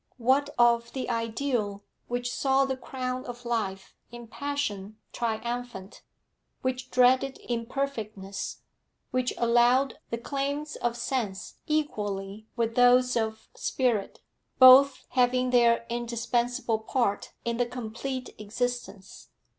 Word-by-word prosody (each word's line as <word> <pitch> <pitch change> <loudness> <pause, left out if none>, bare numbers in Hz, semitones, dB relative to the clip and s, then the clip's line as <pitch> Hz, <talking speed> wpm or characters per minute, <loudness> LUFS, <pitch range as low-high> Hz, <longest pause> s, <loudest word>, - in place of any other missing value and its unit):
What 265 +4 +2
of 235 -1 +3
the 260 - -3
ideal 230 -3 -2 0.2
which 245 0 -2
saw 270 0 +2
the 265 -1 -2
crown 255 0 -4
of 245 0 -8
life 200 -5 -3 0.2
in 240 0 -9
passion 225 -6 -4 0.2
triumphant, 235 -3 -4 0.6
which 255 0 -2
dreaded 255 +2 +3
imperfectness, 230 -5 -4 0.5
which 255 0 0
allowed 240 +3 +3
the 230 - -2
claims 280 +4 -3
of 240 0 -2
sense 220 -9 -3
equally 210 -9 -2
with 230 -1 0
those 250 +1 +5
of 220 -1 -2
spirit, 235 -7 -1 0.4
both 260 +2 +8
having 250 0 +2
their 235 -1 +4
indispensable 235 -1 -1
part 220 -2 -1
in 235 0 -1
the 245 - +2
complete 250 +2 -5
existence? 220 -2 -4
240 Hz, 110 wpm, -27 LUFS, 225-255 Hz, 0.6 s, both